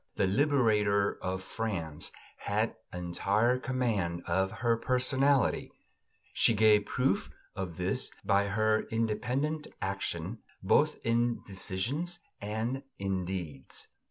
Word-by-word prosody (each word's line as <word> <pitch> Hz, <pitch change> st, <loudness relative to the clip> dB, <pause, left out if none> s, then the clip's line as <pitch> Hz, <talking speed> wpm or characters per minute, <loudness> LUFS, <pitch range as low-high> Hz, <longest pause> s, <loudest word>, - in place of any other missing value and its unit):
The -, -, +2 dB
liberator 105 Hz, -4 st, +3 dB
of 95 Hz, 0 st, -2 dB
France 95 Hz, -9 st, -3 dB, 0.3 s
had 105 Hz, +2 st, 0 dB, 0.2 s
entire 100 Hz, +7 st, +1 dB
command 115 Hz, -10 st, -1 dB
of 95 Hz, +3 st, +1 dB
her 115 Hz, -1 st, +5 dB
personality; 130 Hz, +3 st, +2 dB, 0.6 s
she 115 Hz, -, +4 dB
gave 105 Hz, -1 st, +5 dB
proof 125 Hz, -6 st, +1 dB, 0.3 s
of 90 Hz, -4 st, -4 dB
this 95 Hz, +8 st, -1 dB, 0.2 s
by 100 Hz, 0 st, +3 dB
her 110 Hz, +2 st, +2 dB
independent 125 Hz, +7 st, -1 dB
action, 95 Hz, +1 st, -3 dB, 0.2 s
both -, -, +4 dB
in 120 Hz, +1 st, +1 dB
decisions 120 Hz, -, -3 dB, 0.2 s
and 110 Hz, +6 st, -2 dB, 0.2 s
in 95 Hz, -2 st, -1 dB
deeds." 85 Hz, -8 st, -6 dB
105 Hz, 105 wpm, -31 LUFS, 95-120 Hz, 0.6 s, her